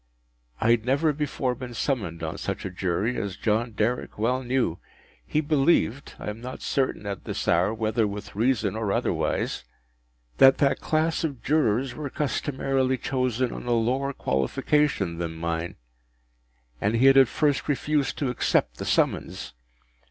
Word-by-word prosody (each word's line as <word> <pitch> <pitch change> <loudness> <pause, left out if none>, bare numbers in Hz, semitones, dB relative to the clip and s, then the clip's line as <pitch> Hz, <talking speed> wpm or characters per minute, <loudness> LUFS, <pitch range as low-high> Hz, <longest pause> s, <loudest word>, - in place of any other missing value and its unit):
I 115 - +3
had 115 -2 +3
never 140 +5 +2
before 140 -3 -1
been 125 -1 -8
summoned 95 - -2
on 80 - -4
such - - -4
a 95 - -4
Jury, 95 +6 -1
as 100 -2 -5
John 115 +1 0
Derrick 110 +4 -1
well 125 +5 +1
knew. 125 -9 0 0.4
He 150 - 0
believed—I 145 -5 +1
am 110 +2 -10
not 125 +1 -7
certain 130 -6 -1
at 100 -2 -5
this - - -4
hour 90 +4 +3
whether 110 0 0
with 100 0 -7
reason 110 -3 +1
or 110 -3 -1
otherwise—that - - 0
that 140 -1 +2
class 160 +1 0
of 140 -6 -3
Jurors 130 -4 +1
were 145 +2 -5
customarily 135 -2 0
chosen 130 -1 -1
on - - -7
a 120 - +2
lower 130 +4 +1
qualification 95 - 0
than 85 -1 -3
mine, 85 +1 -3 1.1
and 105 +3 +1
he 120 +3 +3
had 135 0 +7
at 135 -2 +8
first 145 +3 0
refused 145 0 0
to 135 -4 0
accept - - +1
the - - -5
summons. - - 0
120 Hz, 150 wpm, -26 LUFS, 100-135 Hz, 1.1 s, at